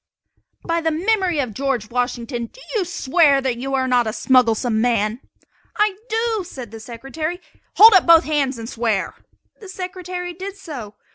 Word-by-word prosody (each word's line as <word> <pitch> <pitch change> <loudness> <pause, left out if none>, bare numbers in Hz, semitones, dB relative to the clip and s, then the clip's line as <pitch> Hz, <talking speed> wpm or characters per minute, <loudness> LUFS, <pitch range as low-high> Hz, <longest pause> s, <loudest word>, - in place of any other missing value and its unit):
"By 335 0 0
the 325 - +1
memory 365 +1 0
of 255 -6 -2
George 255 -4 -2
Washington 240 -1 -2 0.2
you 420 -6 0
swear 300 -3 +3
that 260 -3 -2
you 270 +2 -2
are 260 -1 0
not 245 -2 +2
a 215 - -2
smugglesome 235 -3 +2
man?" 225 -1 0 0.6
"I 420 -2 +2
do," 445 -2 0
said 255 - -9
the 225 - -9
Secretary. 270 +9 -5 0.4
"Hold 440 +2 +9
up 375 -3 +5
both 335 0 +7
hands 280 -4 0
and 225 0 -7
swear!" 225 -5 -1 0.5
The 405 -4 -11
Secretary 365 -1 -6
did 385 +3 -7
so. 250 - -8
275 Hz, 160 wpm, -20 LUFS, 240-360 Hz, 0.6 s, Hold